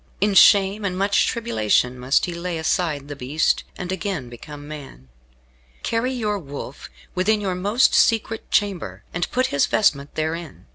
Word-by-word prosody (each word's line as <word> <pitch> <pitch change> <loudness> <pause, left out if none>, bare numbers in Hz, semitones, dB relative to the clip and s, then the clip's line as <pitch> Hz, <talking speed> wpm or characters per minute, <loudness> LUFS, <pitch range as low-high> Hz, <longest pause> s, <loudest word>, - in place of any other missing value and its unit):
In 205 +1 +2
shame 200 +2 +6
and 185 -2 -2
much 200 +1 +2
tribulation 125 - 0
must 125 +3 +2
he 175 - -5
lay 170 0 -4
aside 160 -3 -1
the 145 - -6
beast, 140 +4 0
and 180 0 -5
again 190 - -3
become 145 +5 -10
man. 135 - -10 0.7
Carry 235 +3 0
your 210 -5 -1
wolf 140 -3 -8 0.2
within 210 +4 +2
your 195 -3 -2
most 205 +7 +2
secret 225 0 +2
chamber, 200 -4 -1
and 175 +1 -2
put 255 +1 +1
his 140 - +3
vestment 145 -9 +1
therein. 160 0 -4
180 Hz, 155 wpm, -22 LUFS, 145-205 Hz, 0.7 s, shame